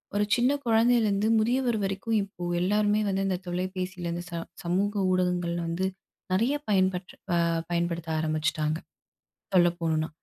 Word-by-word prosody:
ஒரு 205 - +3
சின்ன 250 +1 +3
குழந்தையிலேருந்து, 225 -3 +3
முதியவர் 240 +1 +1
வரைக்கும் 195 +4 -1
இப்போ 190 -3 -8 0.2
எல்லாருமே 210 +3 +2
வந்து 195 0 0
இந்த 185 -2 0
தொலைபேசியில 180 0 -3
இந்த 175 +1 -4
ச - - -8 0.3
சமூக 195 +4 0 0.2
ஊடகங்கள்ல 180 -1 0
வந்து 175 +3 -1 0.5
நிறைய 235 +10 +2
பயன்பட் 185 -2 +1 0.2
அ - - +3 0.3
பயன்படுத்த 170 -1 -1
ஆரம்பிச்சுட்டாங்க, 155 0 0 0.8
சொல்ல 175 -1 +6
போணுன்னா! 160 -1 0
185 Hz, 130 wpm, -27 LUFS, 175-210 Hz, 0.8 s, சொல்ல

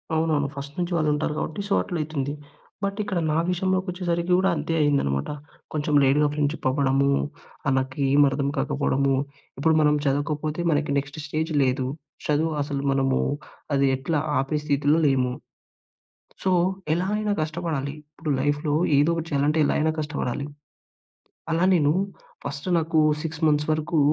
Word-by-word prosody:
అవునవును. 155 -3 +1
ఫస్ట్ 140 +1 -7
నుంచి 175 0 -1
వాళ్ళుంటారు 150 -1 +1
కాబట్టి 160 +5 -3
సో 200 - 0
అట్ల 180 - -5
అయితుంది. 145 -2 -3 0.5
బట్ 200 +1 -1
ఇక్కడ 190 -4 -1
నా 155 - +1
విషయంలోకి 185 +1 0
వచ్చేసరికి 175 -1 -2
గూడా 190 +1 +3
అంతే 155 +2 -2
అయిందనమాట. 70 - +1 0.4
కొంచెం 150 0 -1
లేట్‌గా 145 +3 +4
ఫ్రెండ్‌షిప్ 145 -1 -1
అవ్వడము 135 0 +2 0.6
ఆహ్, 135 - +3
నాకేమి 135 +2 +3
అర్థం 140 +1 -1
కాకపోవడము. 140 -1 +1 0.4
ఇప్పుడు 160 +3 +3
మనం 150 0 +4
చదవకపోతే 150 +3 -1
మనకి 145 -1 +1
నెక్స్ట్ 145 +3 -8
స్టేజ్ 160 +2 -2
లేదు. 130 0 0 0.4
చదువు 155 +2 +1
అసలు 140 -1 -3
మనము 135 -1 +2 0.6
అది 140 0 +3
ఎట్లా 145 +3 -1 0.2
ఆపే 150 +3 -1
స్థితిలో 145 +2 +2
లేము. 130 -2 +2 1.1
సో 190 - +2 0.4
ఎలా 180 +3 0
అయినా 210 -1 -1
కష్టపడాలి. 155 -3 -2 0.2
ఇప్పుడు 155 -2 -4
లైఫ్‌లో 145 +1 0 0.2
ఏదో 150 +4 +4
ఒకటి 165 -1 -3
చేయాలంటే 145 +2 +1
ఎలాగైనా 155 +2 +2
కష్టపడాలి. 145 -3 -3 1.1
అలా 165 +3 +2
నేను 150 -3 +3 0.5
ఫస్ట్ 140 +5 -5
నాకు 160 0 0 0.2
6 160 0 -5
మంత్స్ 150 +1 +1
వరకు 155 +1 0
150 Hz, 140 wpm, -25 LUFS, 140-160 Hz, 1.1 s, లేట్‌గా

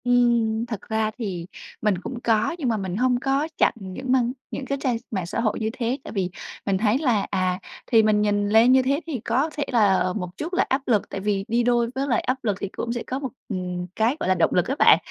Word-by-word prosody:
Ừm, 235 -2 +2
thật 225 -4 -5
ra 220 0 0
thì 185 -8 -4 0.3
mình 210 -3 +2
cũng 235 +7 -6
có, 225 +7 +2
nhưng 265 -6 0
mà 225 - +1
mình 190 -3 -3
hông 250 +1 +2
có 275 +3 0
chặn - - +4
những 205 +7 -5
mang 250 -2 +3 0.2
những 270 - -4
cái 275 +1 -2
trang 250 -4 +1
mạng 190 -5 -2
xã 175 - -3
hội 220 -2 0
như 220 -1 -1
thế, 245 +1 -1
tại - - -8
vì 190 -4 -1 0.4
mình 195 -2 +1
thấy 215 +4 +2
là, 245 -8 +1
à, 185 -2 0 0.3
thì 225 -2 +5
mình 215 -1 +3
nhìn 205 -1 +1
lên 225 +4 +6
như 260 0 +6
thế, 275 +3 +1
thì 285 -7 -3
có 255 +8 0
thể 290 - 0
là, 215 -5 +4
ờ, 180 0 0
một 180 -3 -4
chút 335 +4 -5
là 370 - +2
áp 265 +1 +1
lực, 220 -5 +2
tại - - -4
vì 195 0 -1
đi 235 +1 +1
đôi 240 -1 +2
với 270 +1 -1
lại 240 -4 +2
áp 255 - -1
lực 205 -4 0
thì 200 - -3
cũng 235 - -2
sẽ 240 - -3
có 260 - -2
một, 270 -2 -4 0.2
ừm, 180 -3 -3
cái, 230 +6 +1
gọi - - -1
là, 185 - +4
động 175 - +2
lực 180 - +2
á 270 - -1
bạn, - - +8
230 Hz, 260 wpm, -24 LUFS, 200-255 Hz, 0.4 s, bạn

